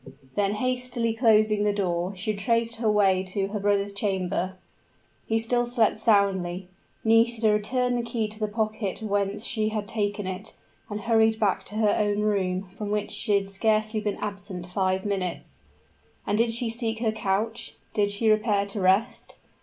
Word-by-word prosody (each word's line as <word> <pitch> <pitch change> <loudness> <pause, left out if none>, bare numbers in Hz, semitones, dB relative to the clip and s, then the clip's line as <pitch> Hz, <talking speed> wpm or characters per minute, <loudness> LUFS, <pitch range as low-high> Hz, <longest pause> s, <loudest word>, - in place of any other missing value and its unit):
Then, 205 -1 +1
hastily 250 -1 -1
closing 215 -2 +3
the 210 - +3
door, 185 -2 -1
she 195 +4 -2
retraced 230 +3 0
her 225 -1 +1
way 195 -3 +3
to 195 +1 -2
her 210 0 -3
brother's 200 0 +1
chamber. 190 -2 -1 0.7
He 225 - +2
still 240 +2 +1
slept 240 -3 +2
soundly; 195 -4 +1 0.3
Nisida 225 0 +4
returned 245 +4 0
the - - +1
key 230 -2 -2
to 215 +1 -11
the 215 - 0
pocket 215 -1 -2
whence 205 +1 -1
she 215 -2 0
had 215 -1 -3
taken 205 -2 -2
it, 190 +3 -5 0.3
and 210 0 -4
hurried 220 0 +3
back 205 -4 +1
to 210 - -8
her 215 -1 +3
own 205 -1 +1
room, 195 -2 0
from 205 +1 -6
which 210 0 -1
she 205 - +1
had 200 -1 +1
scarcely 215 +2 0
been 210 -1 -2
absent 200 -3 -5
five 185 +1 -1
minutes. 190 -4 -3 0.6
And 205 - 0
did 230 +1 +2
she 235 +1 0
seek 225 -1 -2
her 225 -1 0
couch? 220 +1 -2 0.2
did 205 -1 +2
she 205 +3 0
repair 215 -2 +3
to 200 +1 -4
rest? 195 +6 +1
210 Hz, 170 wpm, -26 LUFS, 200-225 Hz, 0.7 s, Nisida